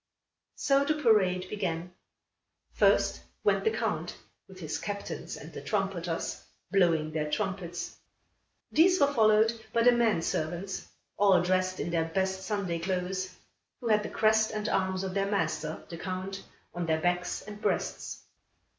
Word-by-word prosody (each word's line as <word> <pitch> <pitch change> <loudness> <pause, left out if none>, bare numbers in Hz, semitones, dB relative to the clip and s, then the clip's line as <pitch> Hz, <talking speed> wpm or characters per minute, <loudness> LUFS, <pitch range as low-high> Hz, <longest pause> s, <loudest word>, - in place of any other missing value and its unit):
So 275 0 +3
the 305 +2 +1
parade 195 -9 +3
began. 180 -3 -3 0.8
First - - +3 0.2
went - - +3
the 445 - +4
Count, - - -2 0.3
with 190 -1 -13
his 160 -3 -3
captains 200 -1 -5
and - - -10
the - - -6
trumpeters, - - -2 0.3
blowing 165 -5 +3
their 155 -1 -2
trumpets. 175 +2 -3 0.7
These 360 +3 +5
were 285 0 +4
followed 220 -1 +5 0.2
by 230 - +3
the 245 - +8
men 230 -8 +2
servants, 175 +6 -3 0.3
all 195 -3 +5
dressed 185 0 +1
in 170 - -2
their 165 -1 +1
best 190 +3 -1
Sunday 195 -6 -1
clothes, 185 +1 -2 0.4
who 240 -3 -3
had 215 -1 +4
the - - -5
crest 220 0 +3
and 215 -1 -3
arms 190 -1 0
of 190 -1 -3
their 195 0 0
master, 160 -5 -1
the 170 - -7
Count, 185 +2 -5 0.3
on 175 -1 -3
their 160 0 +2
backs 175 +1 0
and 210 0 -9
breasts. - - -2
190 Hz, 150 wpm, -29 LUFS, 175-215 Hz, 0.8 s, the